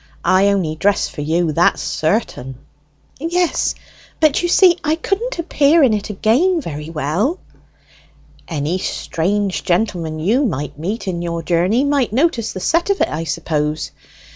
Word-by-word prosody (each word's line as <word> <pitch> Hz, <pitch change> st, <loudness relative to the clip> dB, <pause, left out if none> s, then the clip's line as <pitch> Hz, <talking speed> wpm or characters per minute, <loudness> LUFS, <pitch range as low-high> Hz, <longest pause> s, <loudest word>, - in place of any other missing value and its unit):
I 190 Hz, +2 st, +4 dB
only 190 Hz, -6 st, +1 dB
dress 200 Hz, +5 st, +1 dB
for -, -, -7 dB
you, 160 Hz, +2 st, 0 dB
that's 170 Hz, +3 st, +2 dB
certain." 155 Hz, -, -2 dB, 0.6 s
"Yes, 345 Hz, +3 st, 0 dB, 0.4 s
but 310 Hz, -3 st, +3 dB
you 350 Hz, -, 0 dB
see 355 Hz, -1 st, +5 dB
I 310 Hz, 0 st, +1 dB
couldn't 400 Hz, +8 st, -2 dB
appear 320 Hz, -2 st, +3 dB
in 245 Hz, -5 st, +4 dB
it 210 Hz, 0 st, -3 dB
again 255 Hz, -, +2 dB
very 150 Hz, -, -6 dB
well." 165 Hz, -, -1 dB, 1.1 s
"Any 160 Hz, +3 st, -2 dB
strange 195 Hz, +3 st, -2 dB
gentleman 175 Hz, -4 st, -1 dB
you 215 Hz, -, +1 dB
mid 150 Hz, -, -3 dB
meet 195 Hz, +9 st, -4 dB
in 175 Hz, -2 st, -2 dB
your 170 Hz, -1 st, -3 dB
journey 180 Hz, -, +2 dB
might 280 Hz, -5 st, +1 dB
notice 255 Hz, -4 st, +1 dB
the -, -, -6 dB
set 335 Hz, -, +1 dB
of 400 Hz, -, +1 dB
it, -, -, +2 dB
I 160 Hz, +2 st, -4 dB
suppose. 150 Hz, 0 st, -2 dB
200 Hz, 150 wpm, -18 LUFS, -, 1.1 s, see